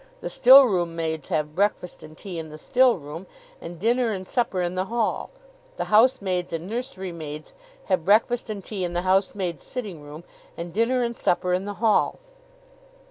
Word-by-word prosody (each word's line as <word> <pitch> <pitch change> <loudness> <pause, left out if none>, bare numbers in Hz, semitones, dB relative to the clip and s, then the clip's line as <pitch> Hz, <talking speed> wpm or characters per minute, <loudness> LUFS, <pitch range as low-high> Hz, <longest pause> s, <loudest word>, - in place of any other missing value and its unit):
The - - -5
stillroom 225 -11 +6
maids 160 -2 -3
have 150 -3 -1
breakfast 190 -1 -1
and 155 0 -13
tea 180 -4 -6
in 160 -1 -7
the 155 - -10
stillroom, 185 - +1 0.3
and 170 +1 -8
dinner 235 +3 +1
and 185 -1 -6
supper 195 -7 0
in 175 0 -2
the 185 +1 -1
hall. 230 +2 -2 0.5
The - - -2
housemaids 200 -6 +3
and 165 +1 -4
nursery 215 -5 -5
maids 155 -2 -8 0.3
have 185 -4 0
breakfast 225 +6 +2
and 205 -3 -5
tea 200 -4 -4
in 175 -1 -3
the 175 +1 -1
housemaid's 185 -3 0
sitting 205 - -6
room, 150 +3 -10 0.3
and 170 0 -6
dinner 240 +4 +1
and 235 0 -2
supper 180 -2 0
in 185 +2 -1
the 205 0 -5
hall. 220 0 +2
185 Hz, 175 wpm, -24 LUFS, 170-225 Hz, 0.5 s, stillroom